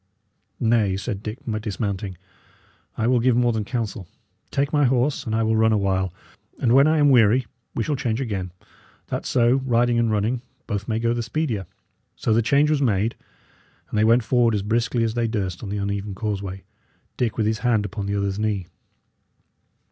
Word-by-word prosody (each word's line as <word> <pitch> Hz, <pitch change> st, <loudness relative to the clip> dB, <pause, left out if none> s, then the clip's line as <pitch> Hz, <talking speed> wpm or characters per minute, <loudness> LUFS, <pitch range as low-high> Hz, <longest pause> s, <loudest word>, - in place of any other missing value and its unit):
"Nay," 110 Hz, -5 st, +2 dB
said 100 Hz, 0 st, -4 dB
Dick, 105 Hz, +2 st, -5 dB, 0.2 s
dismounting, 100 Hz, -3 st, -3 dB, 0.8 s
"I 115 Hz, -, 0 dB
will 125 Hz, +1 st, +3 dB
give 120 Hz, 0 st, +3 dB
more 120 Hz, -1 st, +3 dB
than 110 Hz, -1 st, -1 dB
counsel. 105 Hz, -5 st, -4 dB, 0.4 s
Take 140 Hz, +2 st, -1 dB
my 145 Hz, -1 st, +4 dB
horse, 130 Hz, +2 st, +1 dB
and 110 Hz, -, -1 dB
I 115 Hz, -, +2 dB
will 110 Hz, 0 st, +2 dB
run 110 Hz, 0 st, +4 dB
awhile, 95 Hz, -3 st, +1 dB, 0.5 s
and 120 Hz, -2 st, +2 dB
when 140 Hz, +3 st, +6 dB
I 155 Hz, +1 st, +3 dB
am 145 Hz, -2 st, +5 dB
weary 120 Hz, 0 st, +5 dB, 0.3 s
we 115 Hz, -, 0 dB
shall 150 Hz, -, -1 dB
change 120 Hz, -4 st, -1 dB
again, 100 Hz, -8 st, -3 dB, 0.6 s
that -, -, -3 dB
so, 120 Hz, 0 st, +3 dB
riding 120 Hz, -1 st, +2 dB
and 115 Hz, -1 st, +2 dB
running, 110 Hz, +3 st, 0 dB, 0.2 s
both 105 Hz, -2 st, -3 dB
may 110 Hz, -, 0 dB
go 115 Hz, +1 st, +1 dB
the 120 Hz, -, -2 dB
speedier." 115 Hz, -, -2 dB, 0.5 s
So 110 Hz, -, 0 dB
the 115 Hz, -, +4 dB
change 145 Hz, +5 st, +3 dB
was 150 Hz, -2 st, +1 dB
made, 110 Hz, -3 st, +1 dB, 0.8 s
and 105 Hz, -, 0 dB
they -, -, +4 dB
went 115 Hz, +2 st, +4 dB
forward 115 Hz, -1 st, +2 dB
as 100 Hz, -, -1 dB
briskly 115 Hz, +2 st, 0 dB
as 115 Hz, -1 st, 0 dB
they 120 Hz, 0 st, 0 dB
durst 95 Hz, -5 st, -3 dB
on 105 Hz, -, -6 dB
the 105 Hz, -, -2 dB
uneven 100 Hz, 0 st, -3 dB
causeway, 100 Hz, -3 st, -4 dB, 0.5 s
Dick 115 Hz, -4 st, -1 dB
with 110 Hz, -, +1 dB
his 110 Hz, +1 st, 0 dB
hand 115 Hz, -4 st, +1 dB
upon 100 Hz, 0 st, -4 dB
the 100 Hz, -, -1 dB
other's 100 Hz, 0 st, -1 dB
knee. 105 Hz, -4 st, -1 dB
110 Hz, 190 wpm, -23 LUFS, 100-120 Hz, 0.8 s, when